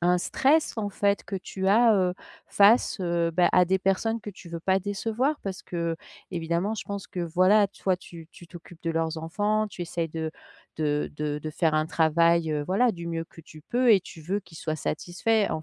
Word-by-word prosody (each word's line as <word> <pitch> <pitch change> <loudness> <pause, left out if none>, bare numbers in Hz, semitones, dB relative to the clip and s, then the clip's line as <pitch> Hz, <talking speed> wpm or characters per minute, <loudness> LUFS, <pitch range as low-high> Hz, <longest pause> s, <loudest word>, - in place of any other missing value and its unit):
un 180 +1 +3
stress 295 - +2
en 210 -2 -2
fait 200 0 0
que 195 - -5
tu 190 +1 -3
as, 225 +2 +5
heu, 185 -2 +2 0.4
face, 210 +2 +4
heu, 170 -2 0
bah, 175 +2 +3
à 180 0 +6
des 190 +2 +1
personnes 220 +4 0
que 210 - -7
tu 180 -2 -13
veux 170 0 -5
pas 190 +2 +2
décevoir. 225 +9 -1
Parce 190 -2 -5
qu'évidemment 170 +2 -3
je - - -5
pense 200 -1 -5
que 180 - -6
voilà 185 +5 +4
toi 190 -2 -1
tu 170 -3 -12
tu 175 - -14
t'occupes 175 -1 -13
de 165 - -1
leurs 165 0 -1
enfants, 210 +7 -1
tu 180 - -11
essayes 170 -1 -3
de 160 0 -4 0.4
de 150 -1 0
de 150 -1 -2
de 155 +1 -6
faire 155 0 +1
un 155 0 +2
travail, 165 +1 +3
heu, 150 -1 -1
voilà 235 +6 +3
du 170 -3 -7
mieux 165 -1 -3
que 165 - -15
tu 155 -1 -15
peux 245 +2 +3
et 195 - +5
tu 165 - -12
veux 195 +6 -2
qu'ils 160 -4 -14
soient 155 -1 -2
satisfaits 200 +8 0
en 155 - -3
180 Hz, 210 wpm, -26 LUFS, 165-205 Hz, 0.4 s, à